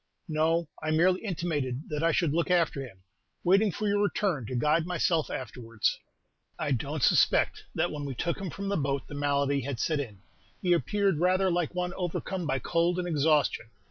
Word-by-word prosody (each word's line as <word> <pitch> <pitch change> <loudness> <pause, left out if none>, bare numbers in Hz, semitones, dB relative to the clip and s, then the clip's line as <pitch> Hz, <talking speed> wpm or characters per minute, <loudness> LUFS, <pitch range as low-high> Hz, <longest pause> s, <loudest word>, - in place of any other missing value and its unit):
"No; 160 +1 +1
I 155 - -2
merely 180 +4 +3
intimated 155 - -2
that 150 0 -2
I 165 0 +3
should 155 -2 +1
look 170 +2 0
after 170 -5 +2
him, 95 -8 -12 0.4
waiting 195 +3 +4
for 210 +4 -3
your 205 0 +2
return 190 - 0
to 130 - -4
guide 155 +6 +2
myself 165 -2 +1
afterwards." 115 -2 -2 0.6
"I 145 - -2
don't 140 +2 -1
suspect - - +3
that - - +1
when 145 -1 -5
we 135 -2 -4
took 170 +7 -2
him 190 - -3
from 200 +5 -5
the 200 - 0
boat 140 -2 -1
the - - -10
malady 140 -1 +1
had 135 -2 -4
set 155 -2 0
in; 105 -8 -6 0.4
he 180 -1 +2
appeared 195 -1 +1
rather 185 +2 +3
like 175 -1 -1
one 180 0 -1
overcome 180 -1 -3
by 135 - +1
cold 170 +5 +1
and 180 -1 -2
exhaustion. 150 -6 +2
160 Hz, 190 wpm, -28 LUFS, 140-180 Hz, 0.6 s, waiting